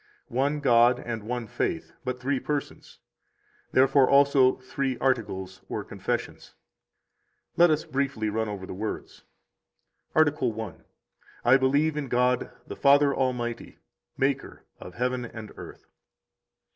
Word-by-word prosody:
One 140 +4 0
God 120 -2 +5
and 115 -2 -5
one 120 +2 -4
faith, - - -3
but 125 0 -3
three 135 +2 -1
persons, 145 0 -5 0.7
therefore 135 0 +4
also 140 -2 +5
three 130 0 -3
articles 95 -7 -2
or - - -3
confessions. - - -5 1.0
8 - - -38
Let 175 0 +7
us 155 0 +1
briefly 135 -5 -1
run 110 +1 -1
over 100 -2 -6
the - - -7
words. 105 +3 -6 0.9
Article 145 -5 +3
I. 110 - -4
9 - - -23 0.6
I 125 +3 +7
believe 140 +4 +2
in 145 -2 -3
God 125 0 +1 0.2
the - - -7
Father 140 0 +5
Almighty, 120 -3 -2 0.4
Maker 135 0 -1 0.2
of 90 - -10
heaven 125 +1 -1
and 110 -2 -8
earth. - - -11
130 Hz, 130 wpm, -27 LUFS, 115-140 Hz, 1.0 s, Let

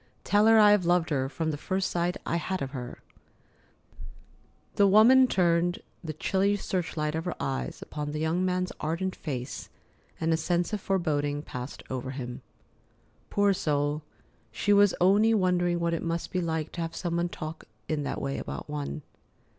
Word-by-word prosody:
"Tell 210 +1 +4
her 225 0 +7
I 210 -1 +7
have 205 -3 +4
loved 175 -1 +2
her 135 -2 0
from 160 +2 -2
the 145 - -4
very - - -18
first 190 0 0
sight 175 +1 0
I 170 - 0
had 185 +2 -2
of 135 - -5
her——" 125 -3 -7 1.7
The 200 - +4
woman 240 +6 +7
turned 175 -3 +2 0.3
the 160 -2 -4
chilly 195 +6 +1
search 185 -4 -3
light 150 0 0
of 160 +1 -3
her 180 - -2
eyes 135 0 -3
upon 150 -1 -5
the 150 - -4
young 160 +3 0
man's 185 0 0
ardent 170 +5 -2
face, 130 -4 -5 0.5
and 165 0 +1
a - - +2
sense 175 +4 0
of 210 - -1
foreboding 145 -7 0
passed 125 -1 -7
over 130 0 -3
him. 125 -2 -6 0.9
Poor 205 -1 +3
soul, 145 -3 0 0.5
she 205 - +1
was 205 -2 +5
only 205 +5 +5
wondering 175 -3 +2
what 170 0 0
it 165 - -1
must 170 0 -3
be 185 - 0
like 160 -2 -2
to 170 - -5
have 165 0 -4
some 170 -2 -2
one 175 0 0
talk 155 -1 -7 0.2
in 155 -1 -1
that 140 - -3
way 140 0 -3
about - - -6
one. 150 0 -4
170 Hz, 185 wpm, -28 LUFS, 150-185 Hz, 1.7 s, her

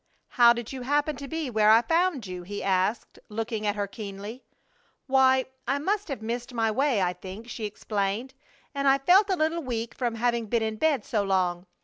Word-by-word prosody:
"How 240 -1 +6
did 240 +1 -3
you 260 - -6
happen 290 +3 0
to 280 - -7
be 320 -3 -3
where 215 -1 +4
I 225 +2 +7
found 330 - +1
you?" 180 -1 -6
he 205 +3 -6
asked, 190 +3 0
looking 220 0 -3
at 205 - +1
her 205 -1 -1
keenly. 205 +3 -8 0.6
"Why, 265 -1 +4 0.2
I 275 - +1
must 400 +8 -1
have 270 -8 -5
missed 240 +2 -4
my 225 -1 +1
way, 255 -3 +1
I 180 0 0
think," 195 +5 -9
she 235 -2 -5
explained, 210 +4 -3 0.4
"and 280 -1 -1
I 270 0 +6
felt 370 +9 +4
a 380 - +2
little 320 +1 0
weak 235 -4 -4
from 240 -3 -2
having 235 0 0
been 230 +1 +1
in 220 0 -2
bed 285 -4 +1
so 215 - 0
long. 185 -2 0
235 Hz, 205 wpm, -27 LUFS, 210-275 Hz, 0.6 s, I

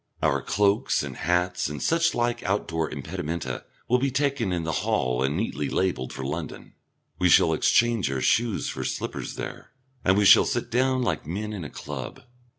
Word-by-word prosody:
Our - - +2
cloaks 100 - +1
and 70 -3 -6
hats 90 +2 0
and 75 - -5
such 165 +1 +2
like 120 0 0
outdoor 80 -5 -1
impedimenta 80 -3 -4 0.2
will 125 +1 +3
be 135 +2 +1
taken 135 -6 0
in 85 -2 -1
the 80 - -2
hall 65 0 0
and 70 +4 0
neatly 85 -8 -2
labelled 90 -9 -1
for 65 - -6
London, 75 +3 -6 0.5
we 90 -1 +3
shall 80 -1 +6
exchange 115 - +2
our 65 -1 -2
shoes 115 - +1
for - - -4
slippers - - -4
there, - - -7 0.3
and 95 +1 +3
we 105 - +3
shall - - +8
sit 120 -2 -2
down 130 +1 +2
like 115 - -2
men 105 +6 -4
in 95 -5 -5
a 75 - -6
club. 70 -3 -7
90 Hz, 180 wpm, -26 LUFS, 75-115 Hz, 0.5 s, shall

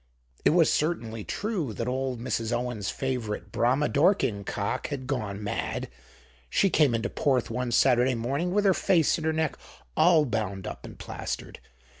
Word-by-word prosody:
It - - +5
was 165 -1 +4
certainly 115 -9 -1
true 190 - -2
that 115 +3 -3
old 130 -1 -2
Mrs. 115 -1 -2
Owen's 120 -5 -2
favorite 120 -6 -3
Brahma 130 +7 +2
Dorking 145 - +2
cock 100 +1 -2
had 140 -3 -5
gone 105 -6 -3
mad; 105 - -3 0.6
she 195 - +2
came 145 -7 +4
into 115 - -1
Porth 130 -4 0
one 125 +1 -2
Saturday 125 +1 +4
morning 140 +10 -1
with 205 +2 +2
her 195 - +6
face 170 -3 +2
and 160 - -5
her 160 - +2
neck 160 -2 -1 0.4
all 165 -3 +5
bound 105 -6 -2
up - - -7
and - - -11
plastered. - - -6
130 Hz, 165 wpm, -27 LUFS, 115-155 Hz, 0.6 s, her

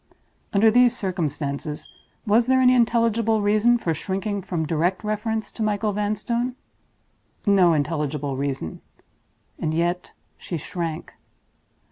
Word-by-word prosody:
Under 215 +2 +5
these 245 +1 +4
circumstances, 150 -4 -3 0.4
was 225 +3 +3
there 260 0 +4
any 255 0 +5
intelligible 230 -2 +2
reason 215 +4 +4
for 170 -8 -1
shrinking 195 +5 -3
from 175 -4 -2
direct 170 +5 0
reference 215 +1 -2
to - - -8
Michael 210 0 0
Vanstone? 215 +4 -1 0.9
No 190 -5 +5
intelligible 150 -2 -1
reason—and 140 - -6
yet 175 +2 -1 0.3
she 170 - -4
shrank. 165 +1 -5
200 Hz, 110 wpm, -23 LUFS, 160-225 Hz, 0.9 s, Under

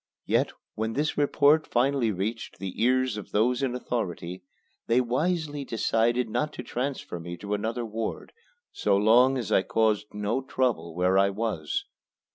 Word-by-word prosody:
Yet - - +2 0.2
when 110 +1 -2
this 150 +5 0
report 145 +1 +3
finally 125 -1 +2
reached 105 +4 -4
the 95 +2 -5
ears 130 -1 +2
of 105 - -7
those 120 +5 +2
in 130 -2 0
authority, 90 -7 -3 0.5
they 115 +2 +4
wisely 145 +4 -1
decided 120 0 +1
not 150 +7 -1
to - - -6
transfer 130 -8 -4
me 85 +1 -7
to 100 +2 -4
another 115 +3 -2
ward 110 0 -5 0.4
so 405 - +1
long 120 +6 +5
as 120 -7 -4
I - - +5
caused 110 0 +1
no 105 +5 -1
trouble 125 -11 -1
where 90 +2 +3
I 100 0 +4
was. 100 -7 -2
115 Hz, 155 wpm, -27 LUFS, 105-130 Hz, 0.5 s, long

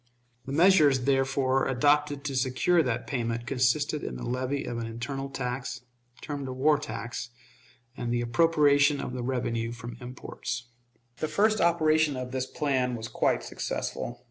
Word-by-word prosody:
The - - -4
measures, 155 -4 +5
therefore, 135 0 +2
adopted 145 +2 +2
to 140 -2 -3
secure 130 +7 +2
that 125 -5 -1
payment 115 -2 -2
consisted 140 +4 +1
in 60 - -4
the 60 - -6
levy 130 +3 -2
of 120 - -4
an 115 - -3
internal 135 +4 -4
tax, 125 -1 -4 0.4
termed 145 -2 -5
a 130 - -4
war 145 +3 +3
tax, 115 -1 -5 0.7
and 120 -2 -3
the 120 0 +1
appropriation 145 +1 +4
of 125 - -4
the 125 - -3
revenue 120 -2 -1
from 120 0 -8
imports. 125 -1 -6 0.5
The 155 - -2
first 215 +5 +2
operation 155 -4 +3
of 125 0 -5
this 130 0 -2
plan 130 -4 0
was 110 -1 -5
quite - - +1
successful. 120 0 -4
130 Hz, 155 wpm, -28 LUFS, 120-145 Hz, 0.7 s, measures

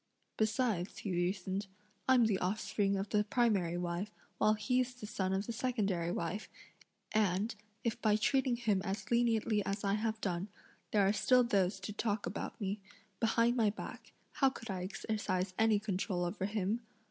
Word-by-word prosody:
"Besides," 215 -4 0
(he 200 - -4
reasoned,) 190 +2 -1 0.4
"I'm 250 -3 +6
the 205 -4 +2
offspring 200 +1 0
of 195 +1 -3
the 210 -1 +3
primary 205 -7 +2
wife, 175 +3 -2 0.3
while 215 0 +4
he's 250 +3 0
the 245 - -8
son 190 -2 -1
of 195 +2 0
the 235 - -3
secondary 200 -9 0
wife, 185 +4 -3 0.6
and, 210 +1 +2 0.3
if 230 -2 -1
by 215 -2 +4
treating 255 +3 +2
him 220 -5 +1
as 200 +2 -4
leniently 225 -3 +2
as 195 +2 -3
I 200 -1 +2
have 220 +1 0
done, 185 -2 -2 0.4
there 205 -2 +3
are 200 - +3
still 215 +5 +5
those 195 -4 +1
to 205 +1 -5
talk 210 -1 -1
about 175 - -4
me, 200 0 -2 0.4
behind 230 +1 +3
my 225 -4 +4
back, 205 - -7 0.2
how 270 - +3
could 230 -5 -7
I 185 -1 -3
exercise 190 -2 -2
any 220 -1 +5
control 190 -3 -1
over 190 +2 -2
him?" 210 +2 -1
210 Hz, 170 wpm, -34 LUFS, 190-225 Hz, 0.6 s, I'm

